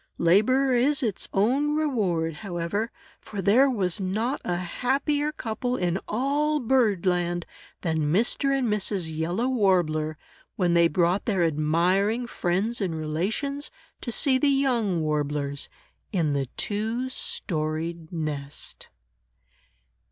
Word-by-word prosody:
"Labor 235 +10 +4
is 265 +3 +3
its 215 -5 -1
own 270 +9 +2
reward," 190 - 0
however, 195 +3 -2 0.3
for 205 - -8
there 225 +9 +5
was 195 -7 -1
not 220 +8 -1
a 175 - -1
happier 275 - 0
couple 245 -2 -3
in 180 +1 0
all 290 +6 +1
bird 225 -7 +2
land 175 -1 0 0.4
than 160 -3 0
Mr. 225 - +1
and 270 -2 +1
Mrs. 195 -6 0
Yellow 175 +10 -1
Warbler, 175 -10 +1 0.4
when 180 -3 +1
they 170 0 +5
brought 175 +4 +1
their 195 -6 +1
admiring 175 +9 +2
friends 210 +2 -1
and 180 -4 -1
relations, 205 - -2 0.3
to 240 - -4
see 260 +2 +2
the 290 - +3
young 240 -10 +2
Warblers, 145 -2 -2 0.4
in 165 -8 +1
the 140 -2 -1
two 220 +5 -1
storied 160 -7 -2
nest. 150 -4 -4
195 Hz, 120 wpm, -26 LUFS, 170-250 Hz, 0.4 s, there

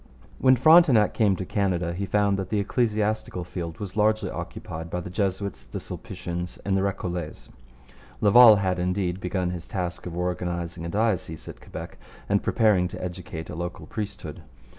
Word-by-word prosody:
When 130 0 +6
Frontenac 135 -5 +6
came 105 -4 +3
to 95 - -5
Canada 90 -4 0
he 100 +3 -3
found 100 0 +2
that 95 -1 -4
the 105 - 0
ecclesiastical 105 -3 0
field 85 -1 -6
was 100 -2 -6
largely 110 0 +2
occupied 80 +1 -6
by 90 - -2
the 90 +1 -7
Jesuits, 100 0 -2
the - - -5
Sulpicians, 90 0 -6
and 100 -1 +1
the 95 - +2
Recollets. 90 -4 -3 0.7
Laval 110 +2 +8
had, 95 -2 0
indeed, 90 0 -1
begun 90 -1 -1
his 85 -1 -6
task 90 -2 -4
of 85 -1 -6
organizing 85 -1 -3
a - - -4
diocese 100 -6 -1
at - - -9
Quebec - - -9 0.3
and 100 0 +2
preparing 105 -6 +3
to - - -8
educate 90 -3 -6
a - - -6
local 85 +1 -5
priesthood. 105 -2 -6
95 Hz, 165 wpm, -26 LUFS, 90-105 Hz, 0.7 s, Laval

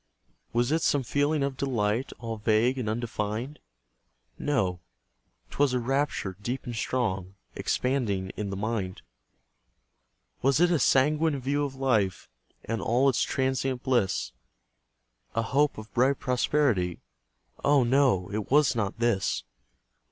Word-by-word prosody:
Was 120 +3 +1
it 160 +1 +2
some 145 -3 +2
feeling 145 +4 +1
of 140 -1 -2
delight 120 -3 0
All 115 -2 -5
vague 110 +5 +2
and 110 -4 -2
undefined? 110 +4 -3 0.8
No; 100 -12 0 0.7
'twas 140 -2 +2
a - - +2
rapture 135 -6 -1
deep 125 +5 -3
and 120 - -5
strong, 95 -6 -2 0.2
Expanding 110 -8 -1
in 105 -1 -3
the 95 - -4
mind. 100 -3 -3 1.4
Was 135 +2 +3
it 175 0 +4
a 170 - +3
sanguine 150 +3 +3
view 140 +3 0
of 140 -2 -4
life, 110 -8 0 0.4
And 115 -2 -2
all 125 +7 +3
its 130 - +1
transient 130 -1 -1
bliss, 120 -8 +1 1.0
A 115 - +1
hope 140 +5 +1
of 110 0 -10
bright 130 +3 +2
prosperity? 125 - +1 0.6
Oh, 140 -2 +4
no! 120 -7 +3
it 105 0 -3
was 145 -2 +4
not 105 -2 -1
this. 115 -4 0
125 Hz, 130 wpm, -27 LUFS, 110-140 Hz, 1.4 s, it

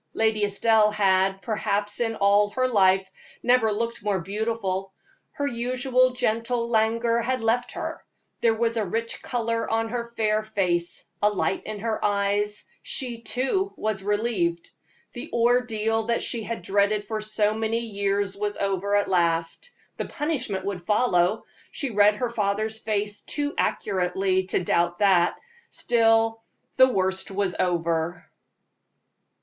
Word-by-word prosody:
Lady 220 -1 +1
Estelle 210 +1 +3
had, 195 -2 +2
perhaps 210 -2 -1
in 225 -2 0
all 205 0 +3
her 255 +4 0
life, 190 -4 +3 0.4
never 245 -3 +3
looked 230 +2 -2
more 205 -2 0
beautiful. 195 0 -3 0.4
Her 285 - -2
usual 255 0 +1
gentle 235 0 -1
languor 230 +1 +2
had 255 +1 -1
left 240 +2 0
her; - - -5 0.4
there 230 -1 +3
was 230 +1 0
a 220 - +1
rich 225 +4 -3
color 230 -2 -2
on 225 0 0
her 235 0 -4
fair 215 -1 +2
face, 185 -5 -2 0.2
a 210 - +4
light 195 -1 -1
in 215 -2 -6
her 225 -1 -2
eyes 205 +1 0 0.2
she, 240 -4 -3
too, 270 +13 -1
was 215 -3 -2
relieved. 200 -5 -1 0.4
The 240 - -7
ordeal 225 -2 +1
she 235 - -2
had 230 +2 -5
dreaded 205 +1 +1
for 215 0 -3
so 215 0 +1
many 225 +1 -1
years 200 -2 -1
was 205 +1 -3
over 200 +1 0
at 205 -1 +2
last 170 - 0 0.3
the - - -3
punishment 255 - -3
would 195 -3 -3
follow. 210 0 +2 0.3
She 275 -5 -3
read 210 0 +4
her 240 +2 -2
father's 215 0 -1
face 210 -1 -2
too 290 0 -3
accurately 190 0 0
to 185 - -1
doubt 175 0 +1
that; 185 -4 +3 0.3
still, 225 -1 +2 0.4
the 260 0 +7
worst 190 -4 0
was 195 -1 -1
over. 170 -1 -1
215 Hz, 140 wpm, -25 LUFS, 195-230 Hz, 0.4 s, the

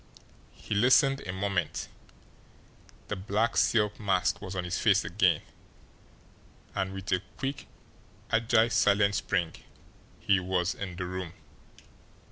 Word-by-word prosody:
He - - -6
listened 130 +5 +4
a - - -2
moment 95 -3 -2 1.2
the 105 - -3
black 105 +4 -1
silk 105 -2 +2
mask 95 -4 0
was 95 -2 -6
on 90 - -2
his 90 - -2
face - - +3
again - - +2 1.3
and 95 -1 -2
with 95 -1 -6
a 90 - +2 0.2
quick, 135 0 -4 0.6
agile, 115 0 +3
silent 100 -1 +3
spring 85 -4 -1 0.7
he 100 -4 +2
was 90 -1 0
in 95 -3 -6
the 90 0 -4
room. 90 -2 -5
100 Hz, 120 wpm, -29 LUFS, 90-110 Hz, 1.3 s, listened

